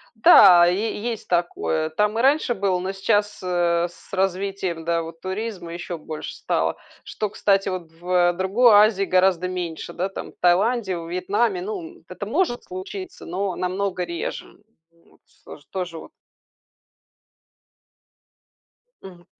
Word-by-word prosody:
Да, 180 -5 +8
е 205 +4 -1
есть 230 -1 -4
такое, 170 -2 0
там 210 +6 0
и - - +2
раньше 275 -1 +3
было, 195 -4 0
но 185 +1 -3
сейчас, 205 +2 0
э, 175 -1 +1
с 185 - -20
развитием, 190 -2 -1
да, 170 0 +1
вот 165 0 -9
туризма 190 -3 -5
еще 175 0 -5
больше 155 0 -7
стало, - - -1 0.3
что, 215 -2 -4
кстати, 195 -1 +1
вот 180 -3 -5
в 175 +1 +1
другой 200 +6 +4
Азии 205 -1 +5
гораздо 185 -1 +2
меньше, 175 -2 -5
да, 190 +2 -2
там, - - -8
в - - -28
Таиланде, 190 +2 +2
во 165 -1 -7
Вьетнаме. 205 - 0
Ну, 410 -1 -4 0.2
м, - - -29
это - - -7
может 290 -11 0
случиться, 350 - -8
но 185 +1 -3
намного 185 0 -2
реже. 170 -1 -6 0.3
Вот 170 0 -28
всё - - -14
ж - - -22
тоже 180 -3 -4
вот - - -12 2.9
Мгм. 180 -2 -13
185 Hz, 145 wpm, -23 LUFS, 175-205 Hz, 2.9 s, Да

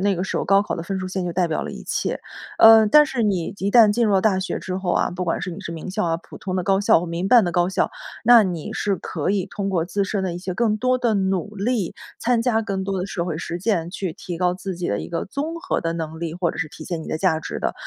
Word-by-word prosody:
那 200 -1 +1
个 180 - -2
时 - - -3
候 - - -1
高 195 +1 +4
考 205 - -3
的 165 - -5
分 190 +2 -3
数 185 - -4
线 185 0 -3
就 175 - -3
代 180 -1 +1
表 160 - -2
了 - - -5
一 - - -9
切。 - - -2 0.4
呃， 225 0 +9
但 300 +6 +7
是 260 -6 -2
你 195 -3 0
一 195 +2 -1
旦 220 -3 +7
进 235 +1 +2
入 210 - +2
了 190 - +4
大 190 -3 +2
学 190 - -3
之 185 -1 -4
后 185 -2 -2
啊， - - +2
不 180 0 -3
管 165 - -1
是 180 - -4
你 - - -8
是 - - -6
名 165 +2 -7
校 195 +1 -1
啊， 165 -1 +1
普 - - -13
通 185 -1 -4
的 185 - -1
高 195 +1 +2
校 200 - +5
或 175 - -4
民 170 +3 -3
办 240 -5 +6
的 175 - -2
高 175 +1 +2
校， 190 - 0 0.3
那 235 -1 +8
你 175 -5 -3
是 200 -2 -1
可 160 +2 -3
以 200 -2 0
通 195 +1 -4
过 170 -3 +1
自 200 +3 -1
身 195 -1 -2
的 175 -2 -2
一 - - -5
些 185 0 -4
更 215 +2 +1
多 255 +3 +1
的 235 -3 +1
努 195 +1 -1
力， 210 -2 -1 0.2
参 235 -1 +1
加 225 -3 +2
更 195 -3 -3
多 195 0 -2
的 180 - -2
社 175 -3 -3
会 160 -3 -3
实 170 - -4
践， 175 -3 0
去 185 -2 -4
提 175 0 -7
高 180 0 +1
自 185 0 -5
己 175 0 -4
的 100 - 0
一 - - -6
个 170 - -3
综 290 +10 -4
合 370 - -1
的 165 0 -2
能 160 -1 -5
力， 165 -1 -4
或 175 -2 0
者 - - -10
是 165 - -1
体 155 - -11
现 170 0 -4
你 - - -10
的 - - -2
价 165 -3 +2
值 - - -6
的。 - - -1
190 Hz, 330 characters per minute, -22 LUFS, 175-205 Hz, 0.4 s, 呃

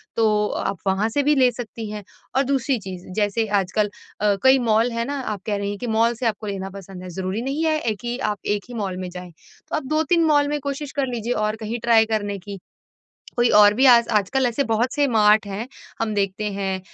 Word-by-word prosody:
तो 210 -2 +2
आप 195 - -3
वहाँ 195 +4 +1
से 285 +5 0
भी 295 +1 +3
ले 255 -2 +5
सकती 230 -2 -7
हैं। 210 -1 -6 0.3
और 270 - +4
दूसरी 270 -1 0
चीज 185 -3 -8
जैसे 215 +1 +1 0.2
आजकल 205 +3 -1 0.3
अ, 205 -1 +3
कई 265 0 +6
मॉल 230 0 +2
है 230 0 -2
ना, 285 +2 -3
आप 210 -6 -4
कह 210 - -1
रही 200 0 -2
हैं 205 - -4
कि 245 - -4
मॉल 230 +1 +2
से 240 - -5
आपको 220 -1 -1
लेना 195 -1 -4
पसंद 195 -1 -10
है, 185 - -7
ज़रूरी 190 +4 -3
नहीं 275 +5 -2
है 310 -8 +1
कि 240 0 -3
आप 205 - -5
1 205 -1 -1
ही 245 - -8
मॉल 195 -5 -3
में 185 -1 -5
जाएँ। 180 0 -9 0.4
तो - - -1
आप 310 - -2
2-3 330 +2 +3
मॉल 290 -2 +3
में 295 0 -1
कोशिश 280 +1 -4
कर 275 -2 0
लीजिए 240 0 -2
और 215 - -1
कहीं 230 +3 -3
ट्राई 230 -2 +5
करने 205 -2 -1
की। 200 +1 -8 0.8
कोई 240 0 +4
और 205 0 +7
भी 260 +4 +2
आज 235 -2 +7
आजकल 245 +6 +1
ऐसे 245 +4 0
बहुत 230 +1 0
से 290 -1 +2
मार्ट 215 -2 +4
हैं, 200 +4 -4 0.3
हम 225 -1 0
देखते 200 0 -1
हैं। 195 -1 -2
220 Hz, 230 wpm, -22 LUFS, 200-250 Hz, 0.8 s, और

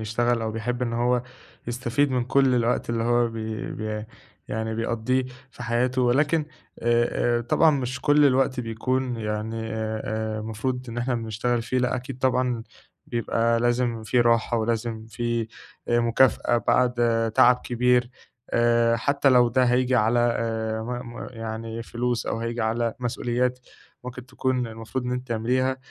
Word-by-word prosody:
يشتغل 115 +2 0
أو 110 - -1
بيحب 120 +3 -3
إن 115 -1 -1
هو 120 +1 +1 0.4
يستفيد 125 +4 0
من 125 -2 0
كل 135 0 +3
الوقت 120 0 0
اللي 115 -1 -1
هو 120 0 +3
بي 110 -1 -5
بي 110 0 -4 0.4
يعني 110 0 -2
بيقضّيه 115 +3 0 0.3
في 125 - -10
حياته. 125 +2 +1
ولكن 145 +5 +2 0.4
آآ 120 0 +2
آآ - - -2
طبعًا 155 +7 +4
مش 130 -2 -2
كل 145 0 +4
الوقت 130 -1 +2
بيكون 125 +2 -2
يعني 110 +1 -3 0.2
أ 110 0 -3
أ - - -3
المفروض 125 +4 -3
إن 115 +1 -5
إحنا 125 +1 0
بنشتغل 115 +1 -1
فيه. 130 +2 -1
لأ 125 0 +1
أكيد 130 +1 -7
طبعًا 125 -2 +1 0.4
بيبقى 115 0 0
لازم 120 -1 0
في 120 +3 +2
راحة 115 0 +2
ولازم 110 0 -2
في 115 0 -2 0.4
أ 120 - +3
مكافأة 120 +1 +3
بعد 120 -2 +2
تعب 125 0 +6
كبير. 125 0 +2 0.4
آآ 115 0 +3
حتّى 140 +4 +2
لو 125 -2 +5
ده 130 +2 +2
هييجي 125 +1 +2
على 115 +2 +3
آآ 115 -2 -1
م 120 0 -6
م - - -6
يعني 115 0 -5
فلوس 120 +1 -2
أو 115 - -2
هييجي 115 +1 -3
على 115 +1 0
مسؤوليات 125 +1 -1 0.5
ممكن 125 0 -8
تكون 130 -1 -1
المفروض 115 +3 -5
إن 125 - -2
أنتِ 125 +1 -4
تعمليها. 125 +3 0
120 Hz, 155 wpm, -25 LUFS, 115-125 Hz, 0.5 s, تعب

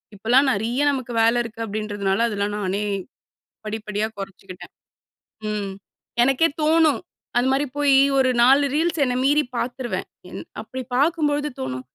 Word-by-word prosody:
இப்போலா 225 +6 +3
நறிய 230 +5 -1
நமக்கு 255 -3 -4
வேல 230 +2 +3
இருக்கு 230 0 -6
அப்டின்றதுனால 205 0 -1
அதெல்லா 200 -2 -1
நானே 200 +1 -1 0.8
படிப்படியா 215 0 -2
குறைச்சுக்குட்டேன். 195 -2 -9 0.8
ம். 205 -2 -3 0.5
எனக்கே 270 +5 +3
தோணும். 315 +1 +3 0.4
அந்த 245 - +3
மாரி 280 +2 +1
போய் 280 -2 +5 0.2
ஒரு 260 - +3
4 275 +3 +5
ரீல்ஸ் 325 0 +1
என்ன 250 -1 -1
மீறி 295 +2 +4
பாத்துறுவேன். 245 0 -3 0.2
என் - - -7 0.2
அப்டி 260 - -7
பாக்கும் 305 +3 +2
பொழுது 295 +1 -1
தோன, 130 -1 -4
240 Hz, 135 wpm, -22 LUFS, 210-280 Hz, 0.8 s, போய்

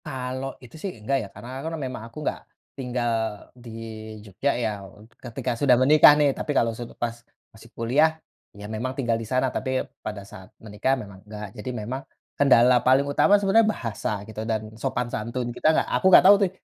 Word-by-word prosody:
Kalau 130 +1 -5
itu 125 - -14
sih 195 - -3
enggak 130 +6 -1
ya - - -7
karena 130 +2 -8
kan 160 +2 -4
memang 130 -6 -5
aku 115 - -16
enggak - - -1 0.4
tinggal 125 -2 -2 0.4
di 120 -1 -13 0.6
Jogja 100 +8 -1
ya 110 - +1 0.5
ketika 120 +1 -4
sudah 130 -4 +5
menikah 150 +4 +7
nih 145 -2 +3
tapi 150 - -4
kalau 115 - +3
su 120 - -6
pas 120 -1 -2 0.4
masih - - -16
kuliah, 150 +8 +2 0.4
ya 105 - -9
memang 125 +4 -2
tinggal 120 -4 0
di 115 - -7
sana 130 0 +1
tapi 130 0 -1 0.2
pada 105 -2 -6
saat 95 -1 -13
menikah 110 +5 0
memang 100 -6 -9
enggak 105 0 -7
jadi 105 +4 -6 0.2
memang, 130 +4 -4 0.3
kendala 125 -3 +5
paling 130 +2 +4
utama 140 +8 +4
sebenarnya 205 +2 +4
bahasa 115 - -3
gitu 110 0 -7
dan 110 -1 -3
sopan 125 - -1
santun 120 +2 -3
kita 140 - -1
nggak - - +1
aku 125 - 0
enggak 185 - +8
tahu 200 +2 +9
tuh 195 - +3
125 Hz, 190 wpm, -25 LUFS, 115-135 Hz, 0.6 s, tahu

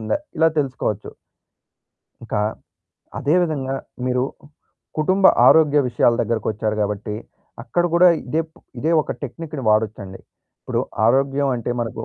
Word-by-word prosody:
ఉందా? 110 - -1 0.2
ఇలా 160 0 +5
తెలుసుకోవచ్చు. 125 -7 -2 1.1
ఇంకా, 110 -2 -2 0.8
అదే 145 +4 +1
విధంగా 140 -6 -2 0.3
మీరు 125 0 +1 0.7
కుటుంబ 185 +5 +1 0.2
ఆరోగ్య 150 -2 +6
విషయాల 120 -1 +3
దగ్గరకొచ్చారు 110 -1 -1
గాబట్టి 105 0 -2 0.5
అక్కడ 175 +8 0
కూడా 180 +1 +7 0.2
ఇదే 155 +6 0
ప్ 170 - -23 0.2
ఇదే 160 +6 0
ఒక - - -4
టెక్నిక్‌ని 150 +1 -6
వాడొచ్చండి. 105 -3 0 0.4
ఇప్పుడు - - -2 0.3
ఆరోగ్యం 135 +3 +2
అంటే 120 0 -4
మనకు 115 -2 -4
130 Hz, 120 wpm, -21 LUFS, 110-155 Hz, 1.1 s, కూడా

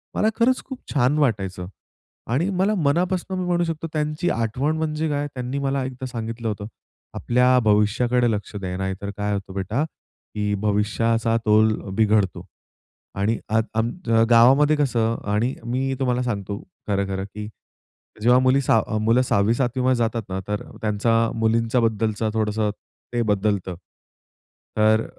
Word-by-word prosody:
मला 215 - +2
खरंच 255 +2 +2
खूप 265 -2 -8
छान 140 +1 +2
वाटायचं 95 -9 0 0.7
आणि 155 +10 +1
मला 195 +2 +1
मनापासून 180 +3 0
मी 180 - -2
म्हणू 175 -1 +1
शकतो 165 -1 -3
त्यांची 155 +2 -1
आठवण 125 +7 -1
म्हणजे 155 0 -1
काय 145 0 -1
त्यांनी 125 +2 -3
मला 135 -1 -1
एकदा 130 0 -6
सांगितलं 115 -2 -5
होतं, 105 -1 -3 0.5
"आपल्या 125 +1 +3
भविष्याकडे 115 +4 +3
लक्ष 105 0 -4
द्या, 95 -2 -4
नाहीतर 95 +1 -3
काय 105 0 -1
होतं 100 -1 -5
बेटा, 100 +8 -1
की 105 -9 -6
भविष्याचा 110 +2 +1
तोल 110 0 +4 0.2
बिघडतो" 105 -4 +2 0.7
आणि 105 +3 0
अद 110 +1 +2
अ, 110 - +3 0.5
गावामध्ये 135 +6 +6
कसं 115 -6 +1 0.2
आणि 120 +5 +1
मी 130 +3 -1
तुम्हाला 125 -2 +1
सांगतो 100 -4 -3 0.3
खरंखरं, 100 -1 -1
की 105 +1 -8 0.7
जेव्हा 125 +3 +5
मुली 130 +2 +3
6 110 -4 +1
मुलं 115 +3 +3
6वी-7वीमध्ये 125 +3 +1
जातात 115 -1 -1
ना 95 0 -3
तर 105 0 -2 0.2
त्यांचा 115 +2 +1
मुलींच्या 115 +2 +1
बद्दलचा 110 -1 0
थोडंसं 110 -1 0 0.4
ते 120 - +1
बदलतं. 100 -4 0 1.0
तर 110 +1 +4
115 Hz, 140 wpm, -23 LUFS, 105-135 Hz, 1.0 s, गावामध्ये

